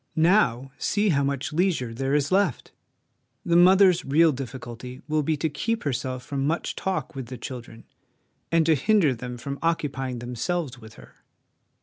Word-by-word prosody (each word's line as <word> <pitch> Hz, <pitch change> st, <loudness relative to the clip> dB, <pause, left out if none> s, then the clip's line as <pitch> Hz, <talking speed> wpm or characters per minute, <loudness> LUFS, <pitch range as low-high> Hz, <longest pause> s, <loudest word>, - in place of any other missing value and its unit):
Now, 140 Hz, -, +3 dB
see 205 Hz, 0 st, +1 dB
how 140 Hz, -5 st, +2 dB
much 140 Hz, +1 st, -2 dB
leisure 160 Hz, -9 st, 0 dB
there 135 Hz, +4 st, -1 dB
is 145 Hz, +1 st, 0 dB
left! 190 Hz, -, +1 dB, 0.7 s
The 170 Hz, -, +2 dB
mother's 180 Hz, 0 st, +6 dB
real 160 Hz, +4 st, +4 dB
difficulty 125 Hz, -2 st, -7 dB
will 155 Hz, 0 st, +1 dB
be 155 Hz, +1 st, 0 dB
to 160 Hz, -, 0 dB
keep 220 Hz, +11 st, -2 dB
herself 130 Hz, -2 st, -3 dB
from 140 Hz, -1 st, -2 dB
much 165 Hz, +3 st, -2 dB
talk 190 Hz, -3 st, -3 dB
with 135 Hz, -4 st, -6 dB
the 125 Hz, +1 st, -7 dB
children, 120 Hz, -2 st, -8 dB, 0.7 s
and 165 Hz, -1 st, +3 dB
to 160 Hz, -, +5 dB
hinder 165 Hz, -1 st, +3 dB
them 125 Hz, +1 st, -7 dB
from 140 Hz, +3 st, -6 dB
occupying 135 Hz, -6 st, -1 dB
themselves 125 Hz, +4 st, -3 dB
with 110 Hz, 0 st, -13 dB
her. -, -, -16 dB
140 Hz, 160 wpm, -25 LUFS, 125-170 Hz, 0.7 s, mother's